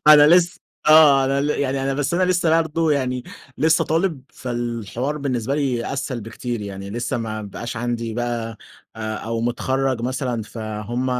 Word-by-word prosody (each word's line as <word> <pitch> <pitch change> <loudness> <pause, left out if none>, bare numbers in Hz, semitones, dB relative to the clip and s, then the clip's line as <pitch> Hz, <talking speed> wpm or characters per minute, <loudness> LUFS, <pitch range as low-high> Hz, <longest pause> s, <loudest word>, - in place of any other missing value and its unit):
أنا 150 -1 +9
لس 175 +2 +4 0.3
آه 150 -3 +7
أنا 135 +1 +1
ل 145 - 0
يعني 135 -2 0
أنا 135 0 0
بس 145 +3 -1
أنا 185 - +2
لسّه 170 -3 +3
برضو 160 0 0
يعني، 130 -3 0
لسّه - - -16
برضو - - -11 0.2
يعني - - -30
لسّه 160 +1 +3
طالب، 165 -2 0
فالحوار 120 +2 -3
بالنسبة 130 -2 -1
لي 135 -4 -1
أسهل 130 -3 -3
بكتير 115 +1 -5
يعني، 100 -1 -6
لسّه 120 +3 -2
ما 110 -2 -4
بقاش 115 +4 -6
عندي 115 -1 -2
بقى، 115 -2 -3 0.4
آآ 110 -1 -3
أو 115 0 -3
متخرَّج 130 +1 0
مثلًا 125 -2 -2
فهُم 110 +3 -4
125 Hz, 175 wpm, -22 LUFS, 115-145 Hz, 0.4 s, أنا